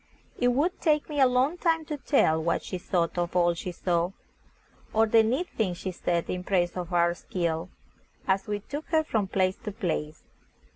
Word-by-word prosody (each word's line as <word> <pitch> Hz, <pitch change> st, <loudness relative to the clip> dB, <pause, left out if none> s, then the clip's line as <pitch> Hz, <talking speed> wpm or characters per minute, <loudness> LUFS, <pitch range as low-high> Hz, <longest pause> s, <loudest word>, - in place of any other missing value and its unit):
It 245 Hz, -, +3 dB
would 290 Hz, +9 st, +1 dB
take 300 Hz, -3 st, +2 dB
me 295 Hz, -1 st, -2 dB
a 265 Hz, -, +7 dB
long 260 Hz, +7 st, +1 dB
time 325 Hz, -2 st, +1 dB
to 300 Hz, -, -3 dB
tell 210 Hz, -, +2 dB
what 170 Hz, +1 st, 0 dB
she 185 Hz, -, -5 dB
thought 175 Hz, -1 st, -1 dB
of 175 Hz, 0 st, -2 dB
all 175 Hz, -1 st, +4 dB
she 175 Hz, +2 st, -5 dB
saw, 175 Hz, +1 st, 0 dB, 0.8 s
or 220 Hz, +1 st, +4 dB
the 225 Hz, +1 st, +5 dB
neat 255 Hz, +11 st, 0 dB
things 185 Hz, -6 st, -1 dB
she 185 Hz, -, -4 dB
said 170 Hz, -1 st, -1 dB
in 180 Hz, 0 st, -3 dB
praise 180 Hz, -2 st, +1 dB
of 180 Hz, -1 st, -5 dB
our 170 Hz, -1 st, +3 dB
skill, 170 Hz, -1 st, -3 dB, 0.6 s
as 195 Hz, +3 st, +1 dB
we 205 Hz, 0 st, -2 dB
took 290 Hz, +8 st, -6 dB
her 315 Hz, -1 st, +2 dB
from 220 Hz, -9 st, -1 dB
place 185 Hz, 0 st, +1 dB
to 215 Hz, -, -6 dB
place. 160 Hz, -7 st, -3 dB
190 Hz, 195 wpm, -27 LUFS, 175-255 Hz, 0.8 s, a